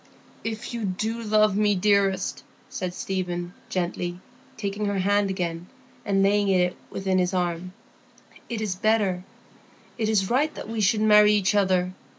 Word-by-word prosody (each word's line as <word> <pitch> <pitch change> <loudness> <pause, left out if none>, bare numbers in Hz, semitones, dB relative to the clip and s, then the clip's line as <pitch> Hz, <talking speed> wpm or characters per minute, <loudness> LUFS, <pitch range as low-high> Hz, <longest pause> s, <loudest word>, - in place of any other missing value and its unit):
"If 225 +2 -5
you 235 -2 -3
do 215 +4 -2
love 215 -2 +3
me, 210 0 +3
dearest," 200 0 +1 0.3
said 180 -1 -4
Stephen, 180 -2 -3 0.2
gently, 175 -1 -2 0.4
taking 205 0 -3
her 200 -1 -1
hand 200 +1 +2
again 175 -2 -3 0.4
and 195 -1 +2
laying 205 +1 +3
it 180 -2 +2
within 190 -1 0
his 180 +1 0
arm, 175 0 -2 0.8
"it 230 -2 -3
is 210 -4 -1
better—it 210 +2 -3
is 200 -3 +2
right 290 +5 +2
that - - -7
we 225 0 -3
should 210 +2 +2
marry 210 -1 +6
each 205 -1 +2
other. 185 -3 +2
195 Hz, 150 wpm, -25 LUFS, 185-215 Hz, 0.8 s, marry